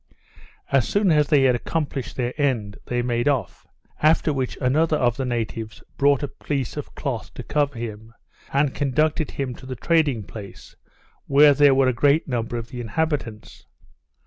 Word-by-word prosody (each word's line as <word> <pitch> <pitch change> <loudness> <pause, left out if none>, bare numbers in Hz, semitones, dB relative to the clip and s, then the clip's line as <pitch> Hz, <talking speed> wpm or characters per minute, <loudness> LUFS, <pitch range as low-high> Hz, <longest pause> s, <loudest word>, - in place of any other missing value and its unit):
As 135 -3 +3
soon 205 -3 +2
as 150 -2 +3
they 145 -3 +4
had 130 -1 +4
accomplished 140 +2 -3
their 125 -1 -2
end, 115 -8 -1
they 120 0 -1
made 120 0 0
off; 135 -9 -1 0.3
after 155 0 +3
which 130 -2 -3
another 155 +4 +2
of 120 -4 +1
the 135 - -3
natives 115 -2 -4
brought 140 0 +3
a - - -1
piece 135 -2 -4
of - - -7
cloth - - -4
to - - -6
cover 145 -3 -1
him, 110 -1 -7 0.4
and 140 0 +1
conducted 150 +3 0
him 135 -3 -4
to 130 - -12
the 130 - -5
trading 145 -5 +1
place, 100 -1 -11 0.5
where 145 +1 +6 0.2
were 135 -1 +4
a 130 - +2
great 145 +6 +2
number 120 -2 -2
of 115 0 -6
the 120 0 -6
inhabitants. 120 -3 -3
130 Hz, 170 wpm, -23 LUFS, 120-145 Hz, 0.5 s, where